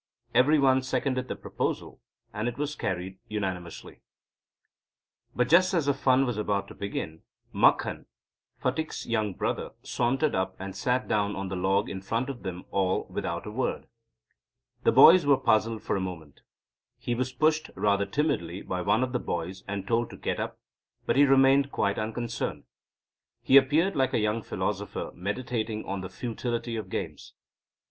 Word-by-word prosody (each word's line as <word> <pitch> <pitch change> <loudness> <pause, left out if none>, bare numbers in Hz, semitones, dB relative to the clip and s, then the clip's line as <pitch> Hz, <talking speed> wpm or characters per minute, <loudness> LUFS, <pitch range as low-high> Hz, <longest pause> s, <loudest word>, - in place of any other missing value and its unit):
Every 130 +6 +5
one 130 -2 +4
seconded 130 0 -1
the - - -4
proposal, - - -4 0.3
and 105 +3 -2
it 120 - -3
was 150 +1 -2
carried 95 -2 -4
unanimously. 95 -5 -5 1.3
But 125 0 +2
just 185 +6 +5
as 165 -4 +2
the 140 - +3
fun 135 0 +3
was 120 -4 -2
about 100 -2 -1
to - - -9
begin, 85 -5 -5 0.3
Makhan, - - +2 0.5
Phatik's 150 +5 -2
younger 110 -4 -1
brother, - - -2
sauntered 135 +5 0
up, 95 0 -1
and 95 0 -6
sat 125 +6 0
down 105 -1 0
on 95 -1 -4
the 95 - -3
log 95 +2 +1
in 95 - -5
front 115 +7 -1
of 120 - -10
them 90 -2 -6
all 95 -1 +1
without - - -3
a - - -6
word. - - -2 1.0
The - - +6
boys 175 +1 +8
were 140 -2 +6
puzzled 110 -1 +1
for - - -1
a 95 - -1
moment. 80 -6 -7 0.6
He 120 - -2
was 130 +2 -1
pushed, 155 +2 +1
rather 100 -1 +1
timidly, 100 - -1
by 90 0 -3
one 105 +7 +2
of 130 - -2
the 125 - 0
boys 90 +1 -4
and 100 -1 -4
told 115 +1 +1
to - - -10
get - - -2
up - - -4 0.5
but - - +1
he 145 +2 +6
remained 135 +1 +5
quite 100 - 0
unconcerned. 115 +2 -3 0.8
He 135 - +4
appeared 150 +8 +5
like 130 -1 +1
a - - +3
young 105 +1 0
philosopher - - -3
meditating 110 +2 -3
on 95 0 -3
the 95 - -6
futility 120 +2 -3
of 105 -4 -5
games. - - -5
115 Hz, 170 wpm, -28 LUFS, 95-130 Hz, 1.3 s, boys